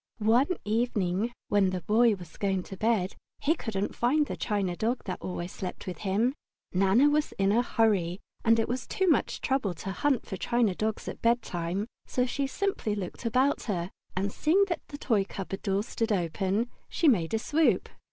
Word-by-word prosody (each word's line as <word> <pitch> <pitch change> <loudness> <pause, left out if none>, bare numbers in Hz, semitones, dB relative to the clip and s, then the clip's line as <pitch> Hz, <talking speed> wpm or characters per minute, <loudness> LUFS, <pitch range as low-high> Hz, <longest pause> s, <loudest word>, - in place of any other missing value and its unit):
One 245 - +3
evening, 215 -2 0 0.2
when 200 -2 +4
the 185 -1 -3
Boy 225 +2 +4
was 175 -4 -12
going 195 -2 0
to 195 - -8
bed, 205 -2 +1 0.2
he 310 - +3
couldn't 210 - -3
find 290 +6 +2
the - - -4
china 200 -5 -1
dog 235 +6 -1
that 185 - -5
always 180 -1 -4
slept 185 -1 -6
with 180 -4 -5
him. 215 +6 +1 0.4
Nana 195 +9 +5
was 295 +1 +1
in 195 0 +2
a 230 +3 +4
hurry, 200 -7 +1 0.2
and 230 -1 +5
it 225 - +1
was 245 +1 -3
too 380 - 0
much 315 - +2
trouble 260 -9 0
to 195 - -5
hunt 270 +5 +1
for 190 - -5
china 235 0 +1
dogs 215 +3 -2
at - - -6
bedtime, 200 -5 0 0.2
so 250 - +1
she 275 +2 -1
simply 325 - -1
looked 195 +3 -6
about 260 +5 +2
her, 180 -4 -2 0.2
and 195 +2 0
seeing 360 - +3
that 345 - -1
the 285 - -7
toy 225 -8 +2
cupboard 195 0 -6
door 195 +1 0
stood 225 0 -2
open, 195 +5 0 0.2
she 335 - +1
made 200 - +3
a - - +3
swoop. 300 +7 +2
215 Hz, 190 wpm, -28 LUFS, 190-245 Hz, 0.4 s, Nana